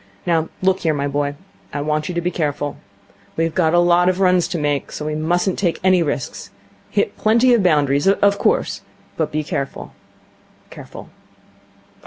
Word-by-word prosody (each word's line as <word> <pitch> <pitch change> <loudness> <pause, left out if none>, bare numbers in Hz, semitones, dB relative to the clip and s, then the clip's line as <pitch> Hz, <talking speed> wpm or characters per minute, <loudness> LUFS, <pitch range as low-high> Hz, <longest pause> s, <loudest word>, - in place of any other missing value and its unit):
Now 165 -2 +1
look 190 0 +2
here, 160 -2 0
my 140 0 -1
boy. 145 0 -2 0.4
I 145 - -3
want 155 +2 -1
you 180 - -4
to 170 - 0
be 175 +1 -1
careful. 145 -3 -2 0.6
We've 165 0 0
a 165 0 +3
lot 175 +1 +4
of 185 0 -1
runs 180 -2 +3
to - - -3
make, 145 -2 -1
so 150 - -6
we 155 - -2
mustn't 175 +4 0
take 175 -4 0
any 185 -1 +4
risks. 145 -5 -3 0.4
Hit - - 0
plenty 235 +3 +4
of 235 - +4
boundaries, 145 -4 +2
of 200 +1 +3
course, - - 0 0.3
but 160 -2 -1
be 155 0 -1
careful. 140 -2 -5 0.8
Careful. - - -11
165 Hz, 170 wpm, -20 LUFS, 150-180 Hz, 0.8 s, lot